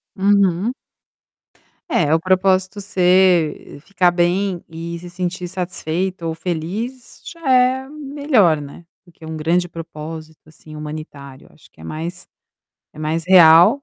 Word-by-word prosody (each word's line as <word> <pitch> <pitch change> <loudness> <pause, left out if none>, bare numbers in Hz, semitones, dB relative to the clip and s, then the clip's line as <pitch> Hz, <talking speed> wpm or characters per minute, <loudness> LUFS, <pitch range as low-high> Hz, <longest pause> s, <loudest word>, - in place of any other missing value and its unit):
Uhum. 200 +1 +2 1.2
É, 160 - +2
o - - +2
propósito 185 +2 +1
ser 180 -6 +2
ficar 180 0 +1
bem 175 +1 0
e 165 +1 -6
se 175 +1 -10
sentir 180 0 -4
satisfeita 180 0 -3
ou 165 - -2
feliz 185 +10 -5
já 335 - -10
é 255 +1 +3
melhor, 280 - +1
né, 145 +4 -11 0.2
do 175 - -20
que 165 -1 -15
um 160 0 -6
grande 170 +3 0
propósito, 160 -1 -9
assim, 155 0 -14
humanitário, 150 -3 -9
acho - - -21
que - - -19
é - - -12
mais 165 - -6 0.7
é - - -16
mais 155 +2 -2
real, 175 - +7
175 Hz, 135 wpm, -19 LUFS, 160-190 Hz, 1.2 s, real